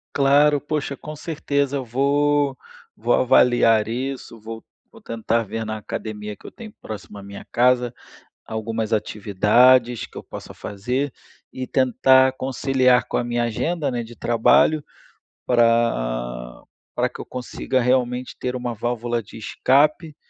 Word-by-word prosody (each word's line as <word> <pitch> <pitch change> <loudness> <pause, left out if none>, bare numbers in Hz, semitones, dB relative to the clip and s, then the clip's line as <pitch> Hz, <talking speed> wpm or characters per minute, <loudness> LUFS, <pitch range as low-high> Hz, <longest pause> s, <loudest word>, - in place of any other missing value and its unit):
Claro. 145 +1 +4
Poxa, 145 -2 -3
com 155 - -9
certeza 145 -3 -2
eu 135 - -2
vou 140 +2 +1 0.4
vou 120 +2 0
avaliar 115 -3 +4
isso, 125 -1 -5
vou 110 +1 -8 0.3
vou - - -17
tentar 115 0 -1
ver 110 +2 -5
na 110 0 -3
academia 105 -1 -6
que - - -13
eu - - -9
tenho 225 -3 -11
próximo 105 -1 -8
à - - -8
minha 100 0 -9
casa 125 0 +2 0.5
algumas 110 0 -3
atividades 110 +4 +3
que - - -20
eu - - -8
possa - - -10
fazer, 125 +8 -3 0.4
e 130 0 -5
tentar 130 0 +4
conciliar 130 -1 +2
com - - -2
a 120 - -1
minha 120 0 -1
agenda, 145 +6 -1
né, 120 -2 -2
de 115 +1 -11
trabalho, 120 +7 +3 0.6
pra - - 0 0.3
pra - - +1
que - - -12
eu - - -6
consiga 130 0 -2
realmente 125 0 0
ter 125 0 -3
uma 120 -1 -3
válvula 120 0 -2
de 105 - -13
escape, 150 +7 +1
125 Hz, 145 wpm, -22 LUFS, 110-135 Hz, 0.6 s, Claro